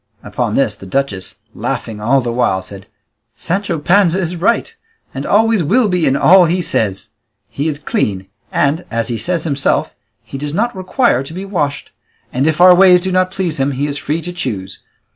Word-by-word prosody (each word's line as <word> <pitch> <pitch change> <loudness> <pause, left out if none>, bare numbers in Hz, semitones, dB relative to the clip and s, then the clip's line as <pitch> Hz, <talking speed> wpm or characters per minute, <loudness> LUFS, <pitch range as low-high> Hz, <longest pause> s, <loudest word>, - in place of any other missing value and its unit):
Upon - - -2
this, - - +1
the 95 - -12
duchess, 100 -5 -2 0.2
laughing 105 -2 -4
all 130 +5 +2
the 120 -1 -3
while, 115 -6 0
said, 95 0 -11 0.5
"Sancho 190 -1 -2
Panza 180 +3 +3
is 175 -1 -2
right, 230 - 0 0.4
and - - -5
always 220 -2 +3
will 220 - +2
be 180 -4 +1
in 135 - +2
all 180 +5 +6
he 175 +3 0
says; 110 - -1 0.4
he 145 +3 -3
is 150 -2 -2
clean, 100 -9 -2 0.3
and, 145 +5 +1
as 115 0 -2
he 120 - -2
says 175 -3 -1
himself, 140 -4 0 0.3
he 135 - -8
does 145 +2 -4
not 235 +3 0
require 185 - +1
to 135 +4 -8
be 190 +2 -5
washed; 150 -8 -3 0.4
and 135 +4 +1
if 160 +1 0
our 180 0 +8
ways 180 -1 +6
do 190 +1 -2
not 185 0 +2
please 185 -5 -3
him, 135 +1 0
he 135 +2 -2
is 145 -1 -3
free 155 +3 -3
to 175 - -6
choose. 105 - -5
160 Hz, 195 wpm, -16 LUFS, 130-185 Hz, 0.5 s, our